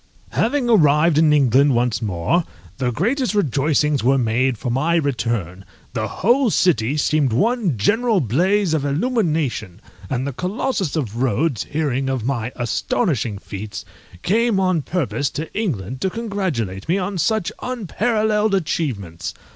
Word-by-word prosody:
_ - - -23
Having 250 +2 +1
arrived 155 -6 +4
in 155 -1 +5
England 140 -1 +4
once 120 -3 0
more, 100 - 0 0.4
the 125 -2 +1
greatest 230 - 0
rejoicings 150 - +1
were 135 +3 +4
made 125 +1 +1
for 120 - -3
my 150 +7 +1
return; 115 - -1 0.3
the 110 -4 -2
whole 240 - +2
city 145 - +2
seemed 150 -3 +2
one 205 - +1
general 225 - +2
blaze 175 - +1
of 155 -3 0
illumination, 155 - -1 0.3
and 130 0 -1
the 140 - -3
Colossus 190 - -2
of 120 -6 -3
Rhodes, 130 - 0
hearing 135 -3 -1
of 130 -4 -2
my 120 -3 -2
astonishing 125 - -1
feats, 105 +1 -7 0.4
came 225 +1 +2
on 185 -4 +1
purpose 145 -3 -1
to 155 +3 -6
England 130 - -3
to 190 - +1
congratulate 185 - -3
me 180 - +3
on 190 0 -3
such 220 +2 0
unparalleled 215 -2 0
achievements. 115 - -3
150 Hz, 140 wpm, -20 LUFS, 120-195 Hz, 0.4 s, in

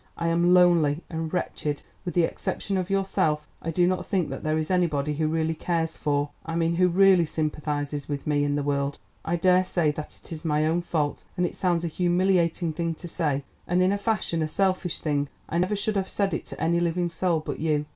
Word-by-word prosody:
I 170 0 0
am 170 +1 +3
lonely 175 -4 +4
and 160 -1 -3
wretched. 150 -5 -2 0.2
With 175 - -4
the 175 - +4
exception 195 +4 -2
of 185 0 -1
yourself, 190 -6 +1 0.2
I 165 - -4
do 175 +2 +3
not 185 0 +1
think 180 -7 -1
that 135 - -5
there 155 0 +1
is 155 +2 -2
anybody 150 -5 +1
who 155 +1 0
really 160 0 0
cares 165 0 -1
for—I 145 +2 -2
mean 170 0 +1
who 180 0 +5
really 185 -1 +5
sympathises 150 -2 -2
with 145 -1 -3
me 145 -1 +2
in 145 0 0
the 145 - -1
world. 140 0 -1 0.3
I 170 - 0
daresay 180 -2 +3
that 150 +1 -7
it - - -11
is 155 -2 -6
my 150 -1 +1
own 165 +2 +1
fault 155 -4 -1
and 180 - +2
it - - -4
sounds 175 -2 +1
a - - 0
humiliating 175 -1 +1
thing 165 0 -2
to 175 - -9
say, 150 -5 -1 0.2
and, 180 +1 +2
in 185 - +3
a 200 - +1
fashion, 200 -6 0
a 155 - +1
selfish 185 +1 0
thing. 145 -2 -1 0.2
I 170 - -1
never 185 +4 +1
should 205 +1 -1
have 190 -1 -1
said 200 -1 0
it - - -3
to - - -8
any 170 +1 +2
living 175 0 0
soul 170 -1 0
but 155 - -5
you. 150 -2 +1
165 Hz, 220 wpm, -26 LUFS, 150-180 Hz, 0.3 s, who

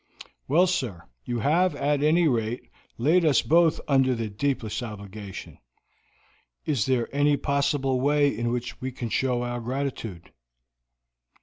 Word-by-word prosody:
"Well, 165 +7 +4
sir, 125 - -2 0.2
you 120 -2 -2
have, 165 - +2
at 145 0 0
any 160 +3 +4
rate, 120 -2 -2 0.3
laid 160 +9 +3
us 150 -4 +3
both 165 0 +3
under 135 -2 +3
the 115 -2 -3
deepest 120 -1 -2
obligation. 100 -3 -8 1.1
Is 135 -7 0
there 125 -3 +1
any 145 0 +3
possible 140 -2 0
way 145 0 +3
in 120 0 -1
which 120 +1 -4
we 130 0 -3
can 120 -2 -5
show 125 0 0
our 120 0 -3
gratitude?" 120 -8 -5
130 Hz, 135 wpm, -26 LUFS, 115-145 Hz, 1.1 s, Well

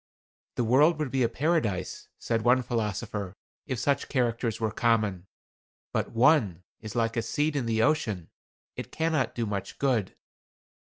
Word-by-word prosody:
"The 120 - 0
world 145 +8 +4
would 150 -4 -2
be 135 - 0
a 115 - +3
paradise," 125 - -1
said 115 -1 -1
one 125 +3 +3
philosopher, 105 -4 -3 0.3
"if 130 - -2
such 140 +4 0
characters 120 -3 0
were 110 -2 0
common. 105 -6 +1 0.7
But - - 0
one 115 - +3 0.2
is 110 -2 -8
like 115 -1 0
a - - +2
seed 145 +6 -1
in 130 -5 -1
the 110 -1 +2
ocean; 110 - 0 0.4
it - - -7
cannot 160 -4 0
do 115 - -1
much 100 -2 -4
good." 125 -8 0
115 Hz, 155 wpm, -28 LUFS, 110-135 Hz, 0.7 s, world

